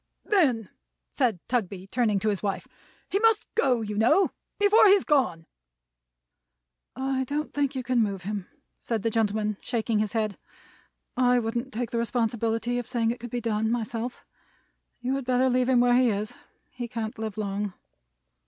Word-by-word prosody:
"Then," 260 Hz, -, +2 dB, 0.4 s
said 245 Hz, -8 st, +1 dB
Tugby, 200 Hz, -6 st, -2 dB
turning 215 Hz, 0 st, +1 dB
to 215 Hz, -, +1 dB
his 200 Hz, -3 st, -1 dB
wife, 195 Hz, -2 st, -2 dB, 0.4 s
"he 395 Hz, -, 0 dB
must 450 Hz, 0 st, +3 dB
Go, 255 Hz, -, +2 dB
you 210 Hz, -1 st, -4 dB
know, 235 Hz, -, +4 dB, 0.3 s
before 415 Hz, +1 st, +6 dB
he's 395 Hz, -1 st, +6 dB
Gone." 255 Hz, -, +1 dB, 1.5 s
"I 265 Hz, 0 st, -1 dB
don't 295 Hz, +4 st, -3 dB
think 285 Hz, -1 st, 0 dB
you 260 Hz, -, -2 dB
can 245 Hz, -1 st, +2 dB
move 200 Hz, -4 st, -1 dB
him," 200 Hz, -1 st, -4 dB, 0.3 s
said 225 Hz, -4 st, -3 dB
the 225 Hz, -, +1 dB
gentleman, 215 Hz, -1 st, 0 dB
shaking 230 Hz, -2 st, -1 dB
his 215 Hz, +1 st, -1 dB
head. 215 Hz, -3 st, -1 dB, 0.8 s
"I 250 Hz, -1 st, +4 dB
wouldn't 240 Hz, +3 st, -2 dB
take 240 Hz, -1 st, -3 dB
the 235 Hz, -, 0 dB
responsibility 230 Hz, 0 st, 0 dB
of 245 Hz, -, -6 dB
saying 230 Hz, -2 st, +1 dB
it 240 Hz, -, -5 dB
could 240 Hz, +1 st, -7 dB
be 240 Hz, +1 st, -3 dB
done, 220 Hz, -1 st, 0 dB
myself. 235 Hz, +1 st, -3 dB, 0.8 s
You 250 Hz, +2 st, -1 dB
had 275 Hz, -, -5 dB
better 255 Hz, +1 st, +2 dB
leave 250 Hz, 0 st, +2 dB
him 250 Hz, -2 st, +5 dB
where 245 Hz, 0 st, +4 dB
he 250 Hz, 0 st, +5 dB
is. 210 Hz, 0 st, -2 dB, 0.4 s
He 245 Hz, -1 st, -5 dB
can't 225 Hz, -2 st, -5 dB
live 220 Hz, -1 st, -4 dB
long." 200 Hz, -1 st, -3 dB
235 Hz, 170 wpm, -27 LUFS, 215-255 Hz, 1.5 s, before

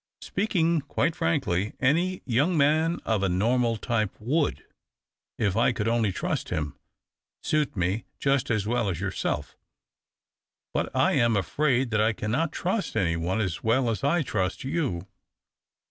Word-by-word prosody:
Speak 210 Hz, +1 st, -2 dB
ing 165 Hz, -1 st, +3 dB
quite 145 Hz, +3 st, -1 dB
frankly, 85 Hz, +4 st, 0 dB
any 170 Hz, +8 st, +1 dB
young 145 Hz, +9 st, +2 dB
man 155 Hz, +4 st, +3 dB
of 110 Hz, -3 st, +1 dB
a 100 Hz, -, +1 dB
normal 115 Hz, +5 st, +1 dB
type 110 Hz, -3 st, 0 dB
would, 145 Hz, +7 st, 0 dB, 0.7 s
if 100 Hz, -3 st, 0 dB
I 115 Hz, +3 st, +3 dB
could 110 Hz, -3 st, -2 dB
only 115 Hz, -3 st, +2 dB
trust -, -, -3 dB
him, 75 Hz, -1 st, -2 dB, 0.7 s
suit 150 Hz, -4 st, 0 dB
me 95 Hz, +5 st, 0 dB
just 135 Hz, -1 st, +1 dB
as 110 Hz, -3 st, +1 dB
well 115 Hz, -1 st, 0 dB
as 90 Hz, -, -3 dB
yourself. 95 Hz, -6 st, -2 dB, 1.2 s
But -, -, 0 dB
I -, -, +3 dB
am 115 Hz, -2 st, +3 dB
afraid 130 Hz, +3 st, +1 dB
that 105 Hz, -1 st, +3 dB
T 110 Hz, -, 0 dB
cannot 130 Hz, +10 st, -1 dB
trust 195 Hz, +3 st, -2 dB
any 85 Hz, -3 st, +2 dB
one 85 Hz, +5 st, -1 dB
as 90 Hz, -5 st, -3 dB
well 115 Hz, +2 st, +2 dB
as 110 Hz, -, -4 dB
I 155 Hz, +4 st, +2 dB
trust 95 Hz, -7 st, -2 dB
you. 135 Hz, -, -2 dB
115 Hz, 155 wpm, -26 LUFS, 100-145 Hz, 1.2 s, ing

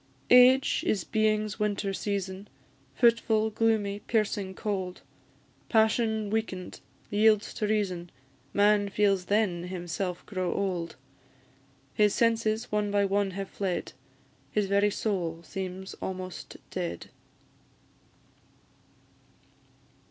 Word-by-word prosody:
Age 250 Hz, +2 st, +6 dB
is 195 Hz, -5 st, +1 dB
being's 215 Hz, -1 st, 0 dB
winter 205 Hz, -1 st, -1 dB
season, 195 Hz, 0 st, -3 dB, 0.5 s
Fitful, 230 Hz, -2 st, +3 dB
gloomy, 210 Hz, -2 st, +1 dB
piercing 210 Hz, -4 st, -1 dB
cold; 190 Hz, -4 st, -3 dB, 0.7 s
Passion 220 Hz, -1 st, +2 dB
weaken'd, 205 Hz, -5 st, -3 dB, 0.3 s
yields 215 Hz, 0 st, +3 dB
to 210 Hz, -, -2 dB
reason, 185 Hz, -5 st, -1 dB, 0.4 s
Man 205 Hz, +2 st, +3 dB
feels 195 Hz, -2 st, +2 dB
then 190 Hz, -4 st, +1 dB
himself 180 Hz, 0 st, -4 dB
grown 185 Hz, -3 st, -2 dB
old; 175 Hz, -4 st, -2 dB, 1.0 s
His 210 Hz, -1 st, +3 dB
senses 230 Hz, -1 st, +1 dB
one 210 Hz, -1 st, 0 dB
by 200 Hz, 0 st, +2 dB
one 200 Hz, 0 st, +1 dB
have 195 Hz, -1 st, -3 dB
fled, 190 Hz, -3 st, -3 dB, 0.6 s
His 210 Hz, +6 st, +1 dB
very 200 Hz, +1 st, +3 dB
soul 175 Hz, -6 st, -2 dB
seems 190 Hz, 0 st, -6 dB
almost 185 Hz, -2 st, -6 dB
dead. 85 Hz, 0 st, -4 dB
205 Hz, 100 wpm, -28 LUFS, 190-215 Hz, 1.0 s, Age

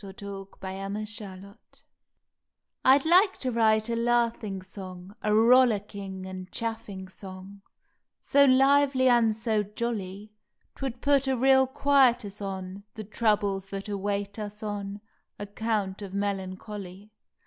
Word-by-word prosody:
May -, -, -8 dB
Eleventh 190 Hz, -, -11 dB, 0.4 s
THE 190 Hz, -, -5 dB
LAUGHING 195 Hz, +2 st, -4 dB
SONG 200 Hz, -2 st, -7 dB, 0.2 s
T 265 Hz, +2 st, -2 dB
D -, -, -3 dB
like 380 Hz, +2 st, +5 dB
to 255 Hz, -, -2 dB
write 220 Hz, -1 st, +3 dB
a 235 Hz, -, -1 dB
laughing 230 Hz, -4 st, 0 dB
song, 185 Hz, 0 st, -10 dB
A 210 Hz, -, 0 dB
rollicking 210 Hz, -5 st, +3 dB
and 185 Hz, -1 st, -8 dB
chaffing 225 Hz, -4 st, -5 dB
song, 190 Hz, +1 st, -11 dB, 0.6 s
So 280 Hz, 0 st, +4 dB
lively 270 Hz, 0 st, +4 dB
and 235 Hz, -3 st, +4 dB
so 220 Hz, -1 st, 0 dB
jolly 210 Hz, -1 st, -5 dB, 0.4 s
Twould 260 Hz, -3 st, -5 dB
put 280 Hz, -1 st, +3 dB
a 265 Hz, -1 st, +1 dB
real 265 Hz, +1 st, +5 dB
quietus 250 Hz, -7 st, +2 dB
on 190 Hz, 0 st, -5 dB
The 220 Hz, -, -6 dB
troubles 205 Hz, -2 st, 0 dB
that 195 Hz, +1 st, -6 dB
await 200 Hz, 0 st, -3 dB
us 210 Hz, 0 st, -6 dB
on 205 Hz, -1 st, -5 dB, 0.4 s
Account 205 Hz, -1 st, -3 dB
of 195 Hz, -1 st, -7 dB
melancholy. 200 Hz, 0 st, -5 dB
210 Hz, 130 wpm, -27 LUFS, 195-235 Hz, 0.6 s, like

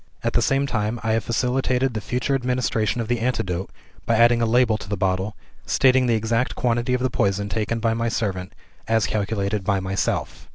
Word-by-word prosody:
At -, -, 0 dB
the -, -, +3 dB
same 135 Hz, +1 st, +2 dB
time, 110 Hz, -3 st, -2 dB
I 110 Hz, -, 0 dB
have 110 Hz, -1 st, +1 dB
facilitated 125 Hz, +2 st, 0 dB
the 110 Hz, -, -3 dB
future 125 Hz, +5 st, -1 dB
administration 125 Hz, -3 st, 0 dB
of 115 Hz, -, -4 dB
the 120 Hz, 0 st, 0 dB
antidote 95 Hz, -7 st, -2 dB, 0.4 s
by 115 Hz, -, +3 dB
adding 120 Hz, +1 st, +5 dB
a 115 Hz, -, +2 dB
label 120 Hz, -1 st, +3 dB
to 100 Hz, -, -10 dB
the 105 Hz, -, -2 dB
bottle, 95 Hz, +2 st, -1 dB, 0.3 s
stating 130 Hz, -1 st, +4 dB
the 115 Hz, -, +3 dB
exact 115 Hz, +3 st, 0 dB
quantity 120 Hz, +1 st, 0 dB
of 125 Hz, -, -2 dB
the 130 Hz, -, 0 dB
poison 100 Hz, -1 st, 0 dB
taken 115 Hz, +2 st, -1 dB
by 115 Hz, 0 st, +1 dB
my 115 Hz, +1 st, -1 dB
servant, 95 Hz, -6 st, -3 dB, 0.3 s
as 115 Hz, -1 st, +2 dB
calculated 100 Hz, -1 st, -1 dB
by 100 Hz, 0 st, +1 dB
myself. 95 Hz, 0 st, -2 dB
115 Hz, 200 wpm, -23 LUFS, 105-125 Hz, 0.4 s, adding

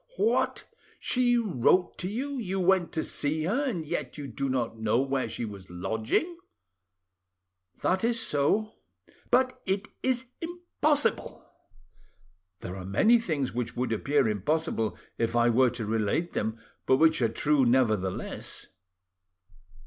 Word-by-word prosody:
"What! 440 Hz, +3 st, +1 dB, 0.3 s
she 245 Hz, -1 st, +2 dB
wrote 180 Hz, -, +2 dB
to 180 Hz, -, -2 dB
you, 270 Hz, +6 st, -3 dB
you 195 Hz, -4 st, -2 dB
went 185 Hz, -1 st, +3 dB
to 160 Hz, -, -1 dB
see 155 Hz, +2 st, -1 dB
her, 240 Hz, -, 0 dB
and 175 Hz, -9 st, -3 dB
yet 150 Hz, -, -4 dB
you 145 Hz, -, -5 dB
do 135 Hz, 0 st, -3 dB
not 120 Hz, -3 st, -1 dB
know 110 Hz, +2 st, +2 dB
where 135 Hz, -1 st, 0 dB
she 120 Hz, -, -4 dB
was 100 Hz, -4 st, -9 dB
lodging?" 110 Hz, -, -1 dB, 1.5 s
"That 185 Hz, +2 st, +1 dB
is 230 Hz, 0 st, +2 dB
so." 205 Hz, +6 st, +1 dB, 0.6 s
"But 255 Hz, +1 st, +2 dB
it 195 Hz, +3 st, -1 dB
is 260 Hz, -1 st, 0 dB, 0.2 s
impossible." 330 Hz, -4 st, -1 dB, 1.2 s
"There 90 Hz, -, -6 dB
are 95 Hz, -, -6 dB
many 215 Hz, -, +4 dB
things 150 Hz, -, -2 dB
which 120 Hz, -1 st, -3 dB
would 125 Hz, -1 st, -1 dB
appear 140 Hz, +3 st, +2 dB
impossible 110 Hz, -, -1 dB, 0.2 s
if 115 Hz, 0 st, 0 dB
I 120 Hz, 0 st, +4 dB
were 125 Hz, +2 st, +4 dB
to 115 Hz, -2 st, -5 dB
relate 110 Hz, +10 st, 0 dB
them, 110 Hz, +1 st, -2 dB, 0.3 s
but 130 Hz, -, +5 dB
which 160 Hz, -1 st, +4 dB
are 115 Hz, -, +3 dB
true, 145 Hz, +4 st, +2 dB
nevertheless." 110 Hz, -7 st, 0 dB
145 Hz, 140 wpm, -28 LUFS, -, 1.5 s, but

